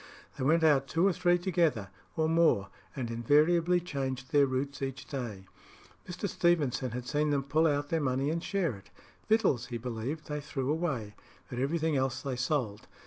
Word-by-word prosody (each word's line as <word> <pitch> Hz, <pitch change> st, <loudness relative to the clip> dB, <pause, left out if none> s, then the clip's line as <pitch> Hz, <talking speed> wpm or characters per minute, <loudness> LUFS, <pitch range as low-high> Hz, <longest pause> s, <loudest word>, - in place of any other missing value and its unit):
They -, -, -4 dB
went 160 Hz, +4 st, +3 dB
out 140 Hz, -4 st, +4 dB
two 165 Hz, +7 st, +1 dB
or 195 Hz, -, +4 dB
three 175 Hz, 0 st, +3 dB
together, 165 Hz, -, 0 dB, 0.3 s
or 160 Hz, 0 st, +2 dB
more, 160 Hz, -12 st, +3 dB, 0.3 s
and 120 Hz, -4 st, -3 dB
invariably 160 Hz, +9 st, +3 dB
changed 135 Hz, -6 st, -4 dB
their 145 Hz, -2 st, +5 dB
routes 135 Hz, +2 st, -3 dB
each 135 Hz, -2 st, -4 dB
day. 115 Hz, -9 st, -5 dB, 0.6 s
Mr. 180 Hz, +3 st, -3 dB
Stevenson 155 Hz, -9 st, +1 dB
had 125 Hz, +1 st, -5 dB
seen 150 Hz, +1 st, +1 dB
them 140 Hz, -2 st, +1 dB
pull 155 Hz, +4 st, +2 dB
out 145 Hz, -1 st, 0 dB
their 165 Hz, -1 st, 0 dB
money 135 Hz, +1 st, 0 dB
and 165 Hz, +1 st, -2 dB
share 190 Hz, -7 st, 0 dB
it. 100 Hz, -, -16 dB, 0.4 s
Victuals, 195 Hz, -, +2 dB
he 120 Hz, -, -4 dB
believed, 125 Hz, +6 st, -4 dB
they 150 Hz, 0 st, -4 dB
threw 135 Hz, -1 st, -2 dB
away; 140 Hz, -11 st, -2 dB, 0.4 s
but 125 Hz, -, -4 dB
everything 155 Hz, +2 st, 0 dB
else 130 Hz, -1 st, -1 dB
they 135 Hz, -3 st, -2 dB
sold. 125 Hz, -5 st, -2 dB
145 Hz, 180 wpm, -30 LUFS, 125-165 Hz, 0.6 s, their